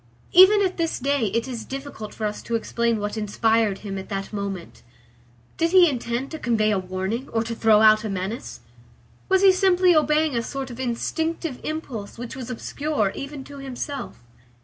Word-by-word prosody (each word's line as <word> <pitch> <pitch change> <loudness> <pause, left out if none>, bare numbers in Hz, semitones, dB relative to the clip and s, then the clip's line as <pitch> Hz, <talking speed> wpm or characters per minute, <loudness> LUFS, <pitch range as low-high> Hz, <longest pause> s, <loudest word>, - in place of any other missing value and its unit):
Even 395 +3 +7
at 375 -1 -1
this 330 -2 -1
day 275 -3 0
it 230 +5 -1
is 240 -4 -5
difficult 270 -6 -7
for 220 - -4
us 210 0 -3
to 235 - -3
explain 230 0 0
what 205 +1 -3
inspired 220 0 +1
him 195 -1 -4
at 190 - -9
that 195 0 -4
moment. 200 -4 -5 0.8
Did 330 +2 +1
he 365 -2 +8
intend 245 -2 -2
to 315 - -6
convey 220 -4 +1
a 200 - +1
warning 190 +7 -4
or 225 0 0
to 230 0 -4
throw 220 -2 +4
out 215 0 +6
a 215 - -3
menace? 195 - -5 0.7
Was 380 0 +4
he 390 - +8
simply 370 -1 +4
obeying 305 -2 +2
a 235 - +1
sort 265 +2 -5
of 240 - -9
instinctive 310 +4 -2
impulse 260 -11 -5
which 240 +1 -7
was 255 -2 -7
obscure 250 -2 -2
even 275 0 -7
to 285 +1 -11
himself? 275 - -6
235 Hz, 185 wpm, -24 LUFS, 215-300 Hz, 0.8 s, he